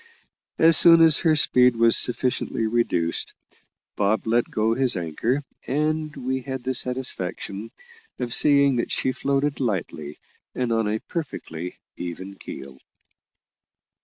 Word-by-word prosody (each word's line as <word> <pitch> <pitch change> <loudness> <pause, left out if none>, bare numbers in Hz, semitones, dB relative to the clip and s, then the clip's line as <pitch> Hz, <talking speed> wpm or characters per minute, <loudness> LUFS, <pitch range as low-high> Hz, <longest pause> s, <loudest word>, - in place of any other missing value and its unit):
As 165 0 +6
soon 165 -1 +7
as 160 -2 +5
her 160 -2 +2
speed 125 -4 +4
was 115 0 +4
sufficiently 125 -2 -1
reduced, 110 -7 -1 0.6
Bob 105 +2 0
let 115 +1 0
go 110 +1 0
his 130 -4 +1
anchor, 100 - -2 0.2
and 155 +2 -2
we 130 +1 -3
had 130 -1 -6
the 130 +1 -2
satisfaction 115 -5 -2 0.5
of 120 -1 -3
seeing 140 -3 +5
that 120 - -2
she 130 - 0
floated 140 +2 -2
lightly 85 - -4 0.4
and 125 -2 -2
on 115 -1 0
a 105 +1 -1
perfectly 90 - -7 0.2
even 90 +3 -7
keel. 65 -8 -11
120 Hz, 130 wpm, -23 LUFS, 105-140 Hz, 0.6 s, soon